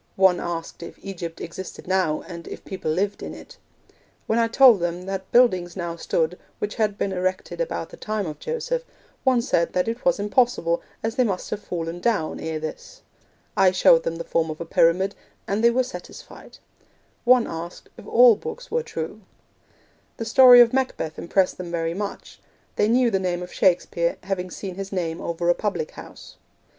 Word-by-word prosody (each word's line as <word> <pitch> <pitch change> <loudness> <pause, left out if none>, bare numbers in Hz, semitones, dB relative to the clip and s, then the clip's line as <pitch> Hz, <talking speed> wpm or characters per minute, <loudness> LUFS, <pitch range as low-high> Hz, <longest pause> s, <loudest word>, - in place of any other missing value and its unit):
One 190 -2 +4
asked 170 -1 -5
if 170 - -9
Egypt 170 -4 -6
existed 175 +2 -8
now, 185 -5 +1
and 170 -2 -9
if - - -9
people 190 -5 -4
lived 195 +6 -1
in - - -6
it. - - -13 0.7
When 225 - +1
I 230 - +3
told 240 -2 +6
them 175 +1 -2
that 190 -1 -5
buildings 185 -8 +3
now 170 -3 -4
stood 165 +1 -1 0.2
which 210 0 -3
had 210 -2 0
been 200 - -1
erected 185 - -2
about - - -3
the - - -12
time 215 -2 -3
of 155 -2 -6
Joseph, 485 +1 -3 0.4
one 255 -3 +3
said 170 -6 +1
that 180 +2 +1
it 230 +2 -3
was 265 - +3
impossible, 205 -5 +1 0.2
as 225 0 -1
they 255 - +5
must 195 -6 -3
have 215 - -3
fallen 170 -2 -4
down 205 -6 0
ere 160 -1 -3
this. - - -8 0.5
I 190 - +5
showed 180 -3 +5
them 165 0 -3
the 170 - -5
form 165 -1 0
of 155 - -6
a 170 - -5
pyramid, 180 +4 +2 0.3
and 205 +3 -1
they 235 - +7
were 255 +2 +2
satisfied. 255 - -11 0.7
One 250 -1 +5
asked 165 +1 -7
if - - -13
all 240 -1 +7
books 465 - -8
were 480 - +1
true. 185 - -6 1.0
The 225 - -4
story 245 +1 +9
of 235 0 +5
Macbeth 255 -12 -2
impressed 185 +2 +1
them 180 -1 -5
very 165 -1 -2
much. 200 +2 -6 0.4
They 210 - +2
knew 240 +1 +3
the 195 - +1
name 180 -1 -2
of 180 - -10
Shakespeare, 170 -2 +1
having 185 -1 -3
seen 190 +1 -6
his 195 +1 -6
name 170 -4 -3
over 170 0 -3
a 175 - +6
public 175 -6 -3
house. - - -12
190 Hz, 190 wpm, -24 LUFS, 170-230 Hz, 1.0 s, story